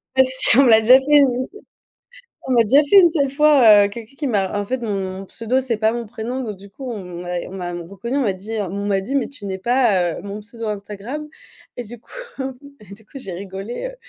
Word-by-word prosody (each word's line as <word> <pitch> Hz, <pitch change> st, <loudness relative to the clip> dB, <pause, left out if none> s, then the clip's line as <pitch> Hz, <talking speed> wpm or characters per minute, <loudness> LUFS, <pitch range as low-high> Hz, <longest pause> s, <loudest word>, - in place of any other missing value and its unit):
Ouais 265 Hz, -, +6 dB
si 260 Hz, -2 st, +1 dB
on 275 Hz, -, +7 dB
me 255 Hz, -, +4 dB
l'a 220 Hz, -1 st, +7 dB
déjà 245 Hz, +4 st, +7 dB
fait 290 Hz, +2 st, +4 dB
au 265 Hz, -, +3 dB
lycée. 260 Hz, +12 st, -5 dB, 0.9 s
On 260 Hz, -, +1 dB
m'a 235 Hz, -, +5 dB
déjà 270 Hz, +7 st, +5 dB
fait 340 Hz, +8 st, +6 dB
une 345 Hz, -3 st, +6 dB
seule 280 Hz, -4 st, +1 dB
fois, 265 Hz, -8 st, +6 dB
heu, 200 Hz, -, -2 dB
quelqu'un 230 Hz, +4 st, -10 dB
qui 295 Hz, -, -4 dB
m'a 205 Hz, -4 st, 0 dB
en 205 Hz, -, -3 dB
fait 255 Hz, +2 st, -3 dB
mon 195 Hz, -3 st, -4 dB
pseudo 230 Hz, +6 st, -1 dB
c'est 245 Hz, -4 st, -2 dB
pas 220 Hz, 0 st, +2 dB
mon 235 Hz, -1 st, -5 dB
prénom, 240 Hz, +3 st, -5 dB
donc 215 Hz, -5 st, -6 dB
du 200 Hz, +1 st, -14 dB
coup 260 Hz, +6 st, -8 dB
on 215 Hz, -5 st, -5 dB, 0.2 s
m'a 180 Hz, 0 st, -4 dB
on -, -, -11 dB
m'a 180 Hz, -2 st, -5 dB
reconnue, 200 Hz, +10 st, -5 dB
on -, -, +1 dB
m'a 215 Hz, -7 st, +1 dB
dit 200 Hz, +4 st, -8 dB
on 200 Hz, +1 st, -4 dB
m'a 195 Hz, -1 st, +1 dB
dit: 270 Hz, +8 st, -4 dB
«Mais 270 Hz, -, +1 dB
tu 250 Hz, -8 st, -12 dB
n'es 190 Hz, -1 st, -4 dB
pas, 195 Hz, -6 st, +2 dB
heu, -, -, -7 dB
mon 205 Hz, +1 st, -6 dB
pseudo 230 Hz, +2 st, -9 dB
Instagram?» 210 Hz, +8 st, -6 dB, 0.5 s
et 245 Hz, -, -4 dB
du 235 Hz, +1 st, -11 dB
coup -, -, -22 dB, 0.7 s
et 200 Hz, -2 st, -13 dB
du 210 Hz, +2 st, -15 dB
coup 275 Hz, -, -11 dB
j'ai 195 Hz, -7 st, -7 dB
rigolé, 195 Hz, -, -6 dB
heu, -, -, -12 dB
225 Hz, 250 wpm, -20 LUFS, 200-260 Hz, 0.9 s, on